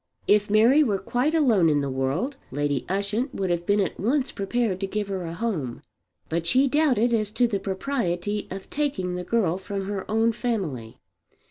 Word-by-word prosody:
If 210 0 +3
Mary 230 +8 +5
were 215 -9 +2
quite 255 +10 0
alone 225 - +4
in 145 -1 +2
the 140 - -2
world 135 - -1
Lady 145 -1 -1
Ushant 205 +7 -1
would 190 -2 -1
have 175 0 -2
been 205 +1 +3
at 195 - -1
once 260 +6 +1
prepared 200 -1 -1
to 195 - -2
give 205 0 -3
her 190 -1 -2
a 165 0 -5
home. 165 - -3 0.4
But 165 +1 -2
she 260 +8 +4
doubted 255 -5 +2
as 215 -2 +1
to 225 +3 +2
the 205 -4 -1
propriety 205 -2 -2
of 190 +1 -7
taking 275 -12 -1
the 180 0 -3
girl 185 -3 +1
from 195 0 -4
her 195 -1 -4
own 225 +2 +3
family. 185 - -3
205 Hz, 190 wpm, -25 LUFS, 180-235 Hz, 0.4 s, Mary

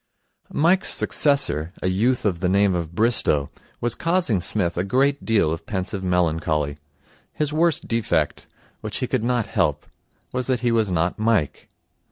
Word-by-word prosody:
Mike's 180 +6 +2
successor, 95 - +1
a - - +1
youth 110 +8 +1
of 90 -5 0
the 90 - 0
name 100 0 +3
of 85 -1 -4
Bristow, 105 -11 +1 0.3
was 120 -1 0
causing 165 - +1
Psmith 90 -1 -1
a 90 - 0
great 135 +7 +1
deal 105 -9 +2
of 80 - -8
pensive 95 -1 -3
melancholy. 80 -5 0 0.6
His 150 -1 -2
worst 165 0 +2
defect 115 -2 -1 0.3
which - - -4
he - - -1
could - - -1
not 120 -2 +1
help - - 0 0.5
was 125 -1 -2
that 130 -3 0
he 120 -1 +1
was 110 -3 +2
not 85 +3 0
Mike. 110 -9 0
105 Hz, 160 wpm, -23 LUFS, 90-125 Hz, 0.6 s, name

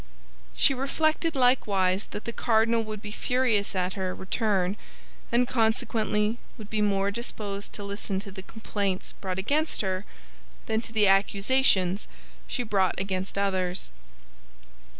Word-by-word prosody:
She - - +5
reflected 310 +4 0
likewise 205 -7 +3
that 210 - -7
the 235 - -4
cardinal 225 0 +2
would 215 -1 -6
be 210 - -6
furious 235 -4 +1
at 185 0 0
her 185 -2 -3
return, 195 -1 0 0.6
and 240 +1 +3
consequently 220 -1 +1 0.2
would 215 -3 -10
be 215 -1 0
more 200 -1 +2
disposed 205 -2 -4
to 205 - -5
listen 200 -1 -3
to 200 - -9
the 190 0 -8
complaints 200 -2 -3
brought 185 -2 -5
against 290 +11 +1
her 190 -1 -1 0.6
than 220 0 0
to 230 - -7
the 215 -2 +3
accusations 195 -1 +3 0.4
she 245 - -2
brought 195 -5 +1
against 190 0 -3
others. 185 - 0
210 Hz, 135 wpm, -27 LUFS, 195-230 Hz, 0.6 s, She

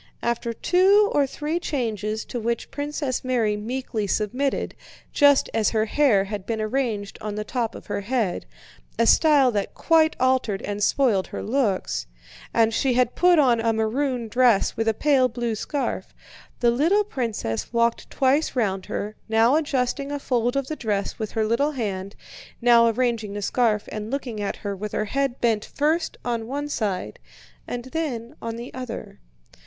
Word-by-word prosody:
After 235 0 -1
two 390 - +4
or 285 -2 +3
three 305 +5 -3
changes 220 - -2
to 245 - -5
which 235 +1 -2
Princess 285 -2 -3
Mary 235 -5 +1
meekly 225 -1 -3
submitted, 245 +8 -1 0.4
just 285 -1 +5
as 225 -2 +2
her 220 -1 +1
hair 225 -4 +3
had 200 -1 -6
been 225 -1 -2
arranged 215 -3 -2
on 210 -1 -4
the 210 - -3
top 230 0 -2
of - - -10
her 205 - -3
head 220 -3 -1 0.5
(a 230 - +3
style 285 -2 +5
that 205 -3 -2
quite 320 -1 +3
altered 255 -6 +1
and 205 0 -4
spoiled 220 -6 +2
her - - -6
looks) 215 - -1 0.4
and 225 -1 +3
she 260 +2 +1
had 250 -1 +2
put 355 -1 +4
on 250 -6 +4
a 225 0 +1
maroon 240 +2 -1
dress 240 -2 +3
with 225 0 -1
a 220 - +2
pale 270 0 +3
blue 240 -1 -3
scarf, 275 +6 -3 0.5
the 240 -1 +4
little 330 - +3
princess 230 - -3
walked 235 -1 +1
twice 275 +3 +1
round 195 -6 -1
her, 210 +1 -4
now 225 +4 +4
adjusting 280 -2 -1
a 290 - -1
fold 245 -3 0
of 275 -1 0
the 310 - -4
dress 205 -7 -2
with 215 -2 -4
her 220 -1 +1
little 280 +7 +1
hand, 200 -6 -4 0.4
now 235 -1 +6
arranging 230 -3 0
the 205 - -4
scarf 220 -2 +1
and 215 0 -5
looking 245 -5 -4
at 200 - -2
her 200 -1 -5
with 210 +2 -6
her 215 - 0
head 275 +2 -1
bent 225 -3 +1
first 315 +3 -1
on 230 -2 -2
one 285 +3 -3
side 210 -9 -3 0.5
and 245 0 -5
then 255 -8 -3
on 230 0 -4
the 235 +2 -8
other. 255 -3 -7
235 Hz, 170 wpm, -24 LUFS, 215-275 Hz, 0.5 s, now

